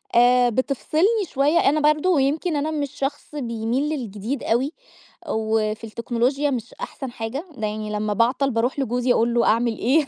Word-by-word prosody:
آآ 245 +1 +5
بتفصلني 310 - +1
شوية. 290 +5 +3
أنا 300 +3 +3
برضه 305 +5 -1
ويمكن 305 +2 +1
أنا 295 +2 -1
مش 290 -3 -2
شخص 290 +1 -4
بيميل 240 +2 -1
للجديد 235 -2 -4
أوي، 255 +6 +1 0.6
وفي 220 -1 0
التكنولوجيا 240 +5 0
مش 240 -2 -4
أحسن 310 - -7
حاجة، 245 +8 -5
ده 215 -1 -1
يعني 215 0 -4
لما 210 0 -1
باعطل 250 +5 +2
باروح 240 +5 0
لجوزي 245 -1 +1
أقول 235 0 +2
له 235 0 +3
أعمِل 230 0 +2
إيه 280 +4 +2
250 Hz, 160 wpm, -23 LUFS, 230-290 Hz, 0.6 s, آآ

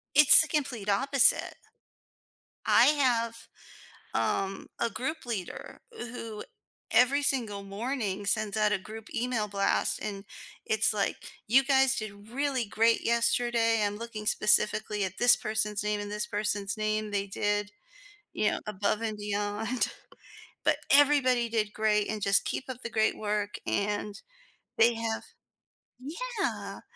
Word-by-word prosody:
It's 295 +1 +9
the 320 - -1
complete 260 -9 -2
opposite. 270 +5 +3 1.1
I - - +6
have, 240 -6 +1 0.7
um, 195 0 -1
a 235 - +1
group 315 +7 -4
leader, 215 -7 -6
who 230 - -7 0.5
every 270 +4 +4
single 220 -8 -1
morning 205 -1 -3
sends 210 0 0
out 215 -1 +2
a 210 - +2
group 215 +3 -10
email 235 -3 -1
blast, 200 -1 0
and 200 -2 -5 0.4
it's 220 0 +2
like, 205 -2 -1 0.3
"You 260 +5 +5
guys 270 -1 +3
did 205 -1 -7
really 270 0 -1
great 225 +2 +2
yesterday. 235 -1 +2
I'm 205 0 -1
looking 220 -2 -7
specifically 210 0 +2
at 190 0 -4
this 245 0 +6
person's 215 -2 -2
name 210 0 -1
and 205 0 -6
this 210 0 -3
person's 205 0 -2
name. 215 0 -1
They 200 -1 -1
did, 205 +1 -1 0.6
you 210 - +1
know, - - -3
above 210 +1 -1
and 220 -2 -2
beyond, 205 +3 -2 0.7
but - - +3
everybody 275 -4 +4
did 215 -2 -1
great 210 -1 +1
and 215 -1 -3
just 200 0 +3
keep 265 - -4
up 255 -1 -6
the 235 - -4
great 220 -1 +1
work," 210 -1 -2
and 205 0 -2 0.6
they 235 +1 +5
have 225 -1 -3 1.2
yeah. - - -3
215 Hz, 140 wpm, -29 LUFS, 205-240 Hz, 1.2 s, It's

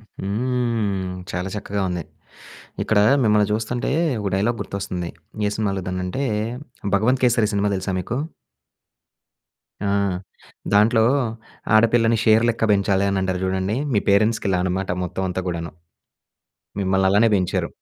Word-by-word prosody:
హ్మ్. 110 -2 -2 0.2
చాలా 90 +1 -3
చక్కగా 100 0 -3
ఉంది. 90 -2 -3 0.8
ఇక్కడ 110 - +2 0.2
మిమ్మల్ని 105 -2 +3
చూస్తుంటే, 115 +3 -2 0.3
ఒక 100 - -1
డైలాగ్ 110 +5 0
గుర్తొస్తుంది. 95 -3 -4 0.4
ఏ - - +1
సినిమాలో 100 -3 -1
దాన్నంటే. 90 +8 -3 0.7
'భగవంత్ 125 +6 +2
కేసరి' 115 -3 +2
సినిమా 100 0 +1
తెలుసా 95 0 -3
మీకు? 110 +7 -3 1.7
ఆ! - - +1 0.9
దాంట్లో 110 +2 +5 0.7
ఆడపిల్లని 115 +1 +4
షేర్ 110 +1 +5
లెక్క 115 -1 0
పెంచాలి 100 -1 +2
అని 100 - 0
అంటారు 95 -1 -1
చూడండి. 95 +3 -1 0.2
మీ 105 - +3
పేరెంట్స్‌కి 105 +3 +3
ఇలా 90 - +2
అనమాట 95 +1 -2
మొత్తం 95 - -4
అంతా 90 +1 -3
గూడాను. 85 -2 -4 1.1
మిమ్మల్ని 95 0 +2
అలానే 105 +4 +4
పెంచారు. 90 -2 -1
100 Hz, 125 wpm, -22 LUFS, 95-110 Hz, 1.7 s, దాంట్లో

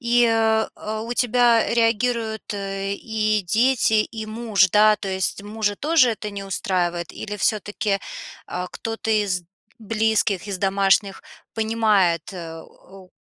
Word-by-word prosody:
И, 240 -1 +3
э, 220 -1 0
у 230 +2 -4
тебя 240 -1 +3
реагируют, 230 -1 0
э, 195 0 -3
и 215 0 -1
дети, 230 +5 +2
и 220 -1 -7
муж, 215 -3 +2
да? 210 +1 +5
То 200 - -6
есть 190 +1 -2
мужа 205 0 -2
тоже 295 -3 +3
это 210 -1 -5
не 200 -1 -7
устраивает? 175 -3 -2
Или 210 0 -6
всё-таки, 205 -1 -1 0.5
а, 180 0 -4
кто-то 225 0 -5
из 205 -4 +1 0.4
близких, 220 -3 0
из 195 -2 -3
домашних 195 0 +1 0.3
понимает, 215 -7 +1
э, 165 -3 -8
о, 190 -1 -17
215 Hz, 130 wpm, -22 LUFS, 195-225 Hz, 0.5 s, да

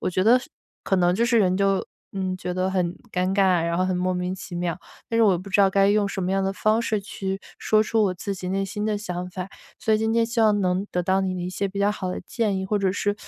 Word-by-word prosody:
我 - - -1
觉 185 +1 0
得 240 +4 +6 0.4
可 195 - +1
能 180 -1 +3
就 230 - +2
是 235 -1 +3
人 185 -3 +3
就， 195 -1 +1 0.3
呃， 190 -1 -2
觉 180 - -4
得 185 +1 0
很 180 -2 0 0.2
尴 185 +1 0
尬， 185 -4 +3
然 170 0 -1
后 185 - +2
很 185 - 0
莫 185 +1 0
名 180 +1 -2
其 185 -1 -9
妙。 175 0 -2 0.3
但 230 - 0
是 - - +5
我 210 -3 +5
也 175 - 0
不 190 +3 -9
知 200 - +3
道 195 - +6
该 195 0 +4
用 205 0 +2
什 195 - -4
么 180 +1 -1
样 195 0 +1
的 190 - 0
方 215 +3 +2
式 220 -2 0
去 195 -1 -4 0.2
说 215 0 +3
出 220 0 +1
我 185 - 0
自 200 +3 -4
己 185 -1 -6
内 195 +1 0
心 210 +2 -4
的 215 -1 0
想 180 -3 -5
法， 185 0 -5 0.3
所 220 - 0
以 215 - +4
今 220 0 0
天 230 0 +3
希 230 0 -1
望 215 -2 +4
能 185 +2 0
得 180 - -1
到 190 +2 +2
你 185 -1 -1
的 180 - -4
一 180 - -3
些 200 +2 -2
比 195 +1 -7
较 200 +1 +3
好 190 -3 -4
的 - - -4
建 215 -4 0
议， 190 - -3
或 210 +1 0
者 195 -1 +1
是 205 0 0
195 Hz, 315 characters per minute, -24 LUFS, 185-205 Hz, 0.4 s, 得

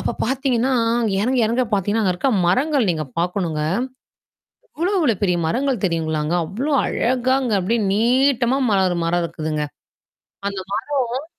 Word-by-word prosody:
அப்ப - - -2
பார்த்தீங்கன்னா, 260 0 0 0.3
அங்க 220 -4 0
இறங்க, 250 +5 +1
இறங்க 235 +4 +1
பார்த்தீங்கன்னா, 205 +2 +1
அங்க 185 - +2
இருக்க 270 +9 0 0.2
மரங்கள் 260 - +2
நீங்க 155 -2 -2
பார்க்கணுங்க. 170 -3 -1 1.2
அவ்வளவு, 365 +5 0
அவ்வளவு 245 - +1
பெரிய 180 -3 +2
மரங்கள் 255 +4 -1
தெரியுங்களாங்க! 160 -2 -1
அவ்ளோ 260 - -3
அழகாங்க! 255 0 0
அப்பிடியே 220 +5 0
நீட்டமா 250 +3 +2
மலரு 190 -3 +3
ஒரு 175 - -1
மரம் 170 +1 +1
இருக்குதுங்க. 155 -2 -3 0.8
அந்த 200 -1 -3 0.5
மரம் 260 +5 -4
220 Hz, 135 wpm, -21 LUFS, 180-260 Hz, 1.2 s, மலரு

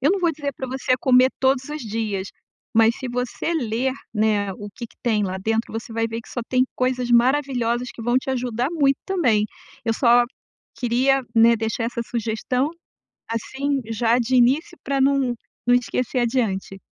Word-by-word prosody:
Eu 285 +6 +3
não 400 - 0
vou 340 -2 +2
dizer 285 -1 -3
pra 260 - -4
você 260 0 -1
comer 255 0 +5
todos 265 +1 +1
os 300 -2 -5
dias, 210 -3 -3 0.5
mas 225 +1 +5
se 260 - -5
você 250 +6 -2
ler, 255 -1 0 0.2
né, 210 -2 +1
o 205 0 -8
que 235 - -6
que - - -25
tem 220 -3 +1
lá 185 0 -3
dentro, 225 +4 -1
você 225 +1 -5
vai 225 0 0
ver 225 +1 -4
que - - -17
só - - +1
tem 255 0 +3
coisas 255 -1 0
maravilhosas 245 -1 +2
que - - -9
vão 240 +2 +1
te 265 - -5
ajudar 250 +1 -1
muito 280 -5 +2
também. 250 - +2 0.4
Eu 225 - +1
só 240 -1 +5 0.5
queria, 255 +3 +2
né, 230 +1 +6
deixar 225 +1 -2
essa 235 0 -3
sugestão, 240 +5 -1 0.6
assim, 270 +4 -2
já 230 +2 +2
de 250 +2 0
início 275 +8 +2
pra 275 0 0
não 270 -3 +2 0.3
não 245 - +6
esquecer 250 +1 -1
adiante. 220 -6 -1
245 Hz, 180 wpm, -23 LUFS, 225-265 Hz, 0.6 s, né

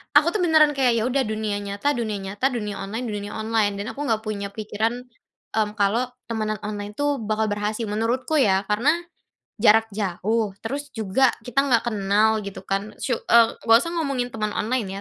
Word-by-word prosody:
aku 300 +3 +7
tuh 400 - +1
beneran 310 -3 +5
kayak, 250 -3 +3
ya - - 0
udah 265 +1 +1
dunia 215 -1 -2
nyata, 200 +9 -1
dunia 220 -4 -2
nyata, 200 +7 -1
dunia 210 -4 -3
online, 225 +5 -4
dunia 205 -1 -4
online. 220 -2 +1
Dan 205 - -4
aku 290 - -5
enggak 220 -1 0
punya 205 -2 -3
pikiran 220 +3 -2 0.5
mmm, 215 -1 +1
kalau 225 +5 +2 0.2
temanan 215 -2 -2
online 205 0 -5
tuh 290 -2 0
bakal 215 +1 0
berhasil. 210 +2 -2
Menurutku 230 +8 -1
ya. 195 -5 +3
Karena 225 +8 +3 0.7
jarak 225 0 +6
jauh, 210 +2 -1
terus 285 +4 -4
juga 220 +5 +3 0.2
kita 250 +3 +2
enggak 240 -4 +2
kenal 215 +1 +2
gitu 195 -1 -8
kan. 195 +2 -3
Su 255 - -1
eee, 230 0 +4
enggak 225 0 +6
usah 335 - -3
ngomongin 270 -6 -1
temen 215 -1 -1
online 225 -1 -1
220 Hz, 180 wpm, -23 LUFS, 210-245 Hz, 0.7 s, aku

